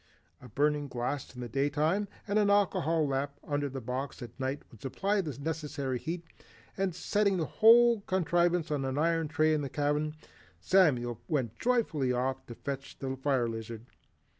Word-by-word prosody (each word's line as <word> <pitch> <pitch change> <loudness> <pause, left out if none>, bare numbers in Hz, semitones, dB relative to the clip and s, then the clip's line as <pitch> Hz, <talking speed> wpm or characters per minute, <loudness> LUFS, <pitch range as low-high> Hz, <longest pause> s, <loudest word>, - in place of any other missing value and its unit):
A 125 - -12
burning 145 0 +1
glass 130 +2 -4
in 125 - -7
the 120 - -4
day 135 +5 0
time 160 +8 +1 0.2
and 205 +1 +2
an 205 -1 +3
alcohol 165 -6 +2
lamp 140 +1 -1
under 145 -1 -1
the 135 0 -5
box 125 +3 -4
at 120 - -8
night 135 +2 -2
would 110 - -16
supply 195 +9 0
the 150 -7 -5
necessary 145 -4 -3
heat, 170 +5 -4 0.5
and 190 -3 -1
setting 200 +1 +1
the 165 - 0
whole 235 +2 +6
contrivance 175 -2 +1
on 145 -2 0
an 135 +1 -2
iron 165 +1 +2
tray 155 +1 +2
in 155 - +1
the 140 - -4
cabin, 150 +2 0 0.4
Samuel 125 - +3
went 130 - -1
joyfully 215 - +1
off 130 +2 -1
to 120 - -8
fetch 140 +1 -6
the 135 -1 -3
fire 135 -2 +1
lizard. 115 0 -6
145 Hz, 175 wpm, -30 LUFS, 130-170 Hz, 0.5 s, whole